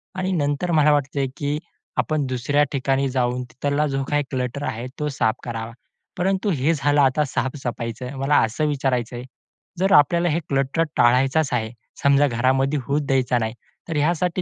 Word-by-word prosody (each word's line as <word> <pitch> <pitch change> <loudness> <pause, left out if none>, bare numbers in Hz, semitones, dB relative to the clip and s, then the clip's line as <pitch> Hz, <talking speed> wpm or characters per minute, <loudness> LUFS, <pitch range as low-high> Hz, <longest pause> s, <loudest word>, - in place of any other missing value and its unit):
आणि 185 0 -1
नंतर 150 +1 0
मला 150 -2 +4
वाटतंय, 140 -1 0
की 145 0 -1 0.4
आपण 155 -2 0
दुसऱ्या 135 +4 +1
ठिकाणी 135 0 0
जाऊन 125 -1 0
तिथला 145 +2 0
जो 135 -1 -1
काही 145 0 +1
क्लटर 130 +2 -3
आहे 115 +3 -4
तो 150 0 -1
साफ 110 -5 0
करावा. 115 -1 -5 0.5
परंतु 190 +3 0
हे 150 +2 +1
झालं 145 -1 +2
आता 135 +3 +3
साफ-सफाईचं, 125 -2 -4
मला 140 +2 +2
असं 130 +8 -2
विचारायचं 130 -4 -1
आहे, 120 - -6 0.6
जर 190 +1 +2
आपल्याला 170 +4 +4
हे 155 - +1
क्लटर 140 +4 +1
टाळायचाच 130 +5 +3
आहे, 110 -2 -1 0.3
समजा 140 +1 +5
घरामध्ये 130 +4 +1
होऊच 145 +2 +1
द्यायचा 130 -2 +2
नाही. 110 0 -2 0.4
तर 160 - -2
यासाठी 170 +4 +1
140 Hz, 160 wpm, -22 LUFS, 125-150 Hz, 0.6 s, समजा